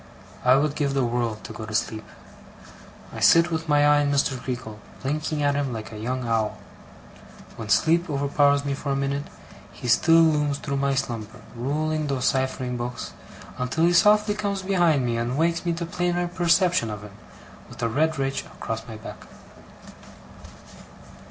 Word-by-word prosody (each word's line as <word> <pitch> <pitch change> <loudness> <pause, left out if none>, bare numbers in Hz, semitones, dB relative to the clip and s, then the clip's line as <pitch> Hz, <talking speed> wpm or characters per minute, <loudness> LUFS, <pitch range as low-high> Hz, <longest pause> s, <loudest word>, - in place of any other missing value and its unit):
I 125 +1 +6
would 145 +1 +1
give 140 -2 -1
the 135 -2 +2
world 120 -2 -2
to - - -8
go 110 - -7
to 110 - -5
sleep. 110 0 -2 1.1
I - - -6
sit 170 +1 +5
with 160 -1 -3
my 145 0 +4
eye 145 0 +5
on 145 -1 +1
Mr. 140 -1 +1
Creakle, 120 -4 -6 0.2
blinking 150 +2 -2
at 145 0 +3
him 140 -2 -1
like 110 -1 -6
a 105 - -8
young 125 +2 -3
owl; 110 -2 0 1.0
when 110 -2 -7
sleep 165 - +3
overpowers 140 0 +2
me 140 - -1
for 140 0 -4
a - - +1
minute, 140 +1 -2 0.5
he - - -8
still 165 +7 +5
looms 150 -3 +2
through 140 -1 -3
my 140 0 +1
slumber, 115 -5 -4
ruling 155 +5 -1
those 135 -3 -1
ciphering 130 -1 0
books, 120 +1 -5 0.5
until 125 +6 -1
he 175 - +3
softly 210 +3 +5
comes 200 -2 -3
behind 175 -8 +2
me 120 -1 -1
and 120 +3 -2
wakes 170 +2 0
me 170 - +2
to 170 +1 -4
plainer 175 +1 -1
perception 175 - +2
of 105 -1 -6
him, 105 -2 -11 0.6
with - - -8
a - - +3
red 155 +6 +1
ridge 135 0 -1
across 115 0 -6
my 110 - -8
back. 110 - -10
140 Hz, 175 wpm, -24 LUFS, 120-160 Hz, 1.1 s, I